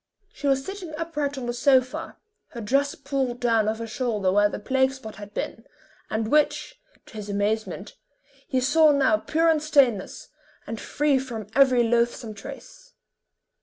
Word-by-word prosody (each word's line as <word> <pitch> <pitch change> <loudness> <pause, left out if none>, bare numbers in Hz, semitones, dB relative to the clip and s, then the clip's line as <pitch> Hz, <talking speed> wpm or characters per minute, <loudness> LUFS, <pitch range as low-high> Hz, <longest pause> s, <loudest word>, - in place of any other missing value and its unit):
She 285 - -4
was 270 -1 +2
sitting 380 -5 -7
upright 300 -4 -3
on 255 - -4
the 240 - -2
sofa, 255 0 +1 0.4
her 235 - -6
dress 275 +6 +1
palled 275 -3 -2
down 225 -3 +2
off 220 - -2
her 230 - -5
shoulder 215 -4 -1
where 205 +1 +4
the - - -5
plague 265 +4 +1
spot 255 -5 -10
had 205 -1 -9
been, 225 - -5 0.5
and 220 0 -2
which, 300 +11 +1 0.2
to - - -17
his 210 -1 -6
amazement, 205 +2 -2 0.5
he 260 -1 0
saw 305 +4 +5
now 265 -6 +3
pure 320 +9 0
and 320 -2 +3
stainless, 275 -10 +1 0.4
and 225 - -6
free 290 -2 +1
from 235 -5 -6
every 255 -2 +5
loathsome 235 -1 0
trace. - - -11
255 Hz, 165 wpm, -25 LUFS, 220-285 Hz, 0.5 s, saw